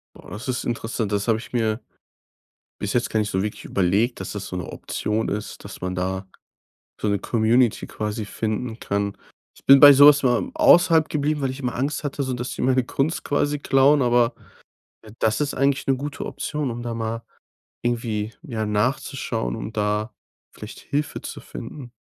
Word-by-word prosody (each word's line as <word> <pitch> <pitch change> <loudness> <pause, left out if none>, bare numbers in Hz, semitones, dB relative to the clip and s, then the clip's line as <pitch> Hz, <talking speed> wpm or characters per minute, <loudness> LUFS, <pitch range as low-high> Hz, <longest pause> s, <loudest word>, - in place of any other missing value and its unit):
Ah, - - -14
das 110 +5 -7
ist 125 -1 -1
interessant. 115 -2 -3
Das 100 +1 -1
habe 115 -2 +3
ich 115 - -11
mir 110 -2 0 1.0
bis 100 - -3
jetzt 120 - +1
gar 110 - 0
nicht 105 -1 0
so 95 - 0
wirklich 105 - -5
überlegt, 100 +6 +1
dass 95 - -5
das 105 -1 -5
so 90 - -6
'ne 90 - -3
Option 110 +1 -3
ist. 105 +1 -5
Dass - - -10
man 90 0 -3
da 95 +1 -2 0.7
so - - 0
'ne 100 -1 +1
Community 115 +2 +2
quasi 105 0 -4
finden 110 +2 -3
kann. 100 0 -2 0.4
Ich - - -21
bin 135 0 +9
bei 145 -1 +11
so 145 +2 +9
was 145 -1 +6
immer 120 -2 +2
außerhalb 165 -2 +5
geblieben, 150 0 0
weil 135 - 0
ich 130 - -6
immer 125 -3 -3
Angst 145 +4 -2
hatte, 140 -1 -2
so, 130 - -2
dass 125 +1 -4
sie - - -5
meine 130 0 +3
Kunst 140 +6 -1
quasi 145 0 0
klauen. 140 +1 +4
Aber, 120 -1 +3 0.7
äh, 110 -1 -13
das 110 +4 +1
ist 145 -1 -1
eigentlich 140 0 +1
'ne 135 - +2
gute 145 +2 -5
Option, 150 -3 -3
um 120 +1 -5
da 120 -1 -4
mal 115 0 -3 0.6
irgendwie, 115 -3 -2
ja, 115 -9 -3
nachzuschauen, 105 - -1
und 110 - -7
da 105 +1 -1 0.4
vielleicht - - -10
Hilfe 145 +1 -3
zu - - -7
finden, 120 - -9
120 Hz, 190 wpm, -23 LUFS, 105-135 Hz, 1.0 s, bei